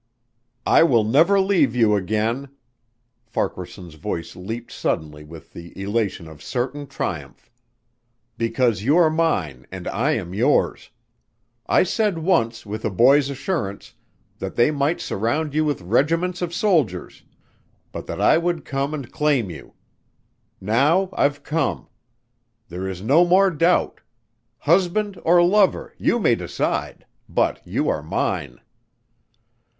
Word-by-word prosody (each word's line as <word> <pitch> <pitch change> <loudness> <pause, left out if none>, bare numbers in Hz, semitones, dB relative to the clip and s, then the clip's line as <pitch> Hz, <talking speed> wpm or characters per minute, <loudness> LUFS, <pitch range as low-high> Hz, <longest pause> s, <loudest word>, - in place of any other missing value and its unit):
"I - - +5
will 125 -9 +4
never 160 - +4
leave 180 - +2
you 110 -3 +4
again." 110 +7 -1 0.8
Farquaharson's 90 -5 -5
voice 85 +2 -5
leaped 115 +6 -7
suddenly 75 -1 -3
with 80 +1 -13
the 85 +2 -11
elation 100 -4 -2
of 80 -2 -13
certain 130 - -3
triumph. 80 - -6 0.8
"Because 115 -2 0
you 140 +9 +3
are 165 -3 +5
mine 95 - -1
and - - -7
I - - 0
am 85 - -4
yours. 100 - +1 0.8
I - - +4
said 205 0 0
once 115 -10 0
with 105 +2 -6
a - - 0
boy's 135 +8 +4
assurance 135 - -4 0.5
that 95 - -5
they 120 +5 +4
might 145 +3 0
surround 140 +9 -2
you 155 +1 +2
with 145 -8 -1
regiments 165 - 0
of 175 -1 -2
soldiers 160 - 0 0.7
but - - -7
that - - -5
I - - +4
would 170 -1 -2
come 140 +2 -2
and 140 -6 -8
claim 145 - +1
you. 80 - -12 0.8
Now 145 - +2
I've 145 0 0
come. 155 -3 -2 0.8
There 90 +2 -5
is 95 0 -6
no 145 +10 +5
more 185 +2 +4
doubt. 165 +3 +1 0.6
Husband 185 - +1
or 175 +1 +5
lover 195 +1 +2
you - - +2
may - - +3
decide - - -3 0.2
but - - 0
you - - -1
are - - 0
mine." - - -3
135 Hz, 135 wpm, -22 LUFS, 100-165 Hz, 0.8 s, I